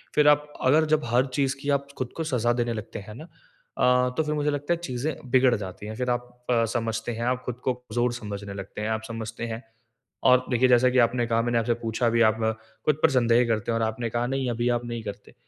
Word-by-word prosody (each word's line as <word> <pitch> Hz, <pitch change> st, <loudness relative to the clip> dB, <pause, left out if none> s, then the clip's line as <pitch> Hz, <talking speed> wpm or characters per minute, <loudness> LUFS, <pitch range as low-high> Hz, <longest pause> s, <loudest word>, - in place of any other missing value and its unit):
फिर 150 Hz, 0 st, +5 dB
आप 150 Hz, 0 st, +4 dB
अगर 155 Hz, +5 st, +5 dB
जब 155 Hz, 0 st, +2 dB
हर 120 Hz, +2 st, +2 dB
चीज़ 140 Hz, -1 st, +1 dB
की 145 Hz, -, -3 dB
आप 140 Hz, 0 st, -14 dB
खुद 130 Hz, -2 st, -3 dB
को 165 Hz, -, -1 dB
सजा 120 Hz, -1 st, +2 dB
देने 120 Hz, -1 st, -1 dB
लगते 110 Hz, 0 st, -6 dB
हैं 105 Hz, -, -8 dB
ना, 150 Hz, -, -9 dB, 0.5 s
अ, 125 Hz, 0 st, +4 dB
तो 160 Hz, -, +3 dB
फिर 150 Hz, -, -2 dB
मुझे 150 Hz, 0 st, 0 dB
लगता 145 Hz, +4 st, -1 dB
है -, -, -1 dB
चीज़ें 130 Hz, +4 st, -2 dB, 0.2 s
बिगड़ 130 Hz, -1 st, +5 dB
जाती 100 Hz, -1 st, -7 dB
है। 110 Hz, -, -6 dB
फिर 125 Hz, +1 st, -2 dB
आप 120 Hz, 0 st, -1 dB, 0.2 s
अ, 115 Hz, -1 st, +3 dB
समझते 115 Hz, 0 st, -2 dB
हैं, 115 Hz, +1 st, -4 dB
आप 125 Hz, 0 st, 0 dB
खुद 125 Hz, -, -3 dB
को 130 Hz, -, +1 dB
कमज़ोर 120 Hz, 0 st, -2 dB
समझने 100 Hz, -4 st, -6 dB
लगते 100 Hz, +1 st, -7 dB
हैं, 105 Hz, -, -2 dB
आप 110 Hz, 0 st, -1 dB
समझते 115 Hz, 0 st, -5 dB
हैं 115 Hz, +3 st, -7 dB, 0.7 s
और 125 Hz, 0 st, +5 dB
देखिए 125 Hz, +1 st, +4 dB
जैसा 125 Hz, +1 st, +5 dB
कि 130 Hz, -, 0 dB
आपने 120 Hz, 0 st, -1 dB
कहा 115 Hz, 0 st, +2 dB
मैंने 120 Hz, 0 st, 0 dB
आपसे 115 Hz, +1 st, +1 dB
पूछा 115 Hz, +1 st, +1 dB
भी 115 Hz, 0 st, +2 dB
आप 110 Hz, -, -2 dB, 0.5 s
खुद 150 Hz, -2 st, +3 dB
पर 160 Hz, -, +7 dB
संदेह 120 Hz, -1 st, +4 dB
करते 110 Hz, -1 st, 0 dB
हो 115 Hz, -, +1 dB
और 115 Hz, -, 0 dB
आपने 110 Hz, +1 st, -2 dB
कहा 120 Hz, +2 st, -1 dB
नहीं 135 Hz, -1 st, -1 dB
अभी 120 Hz, +1 st, 0 dB
आप 120 Hz, -, -8 dB
नहीं 120 Hz, -1 st, -4 dB
करते। 100 Hz, -2 st, -8 dB
120 Hz, 250 wpm, -26 LUFS, 115-130 Hz, 0.7 s, पर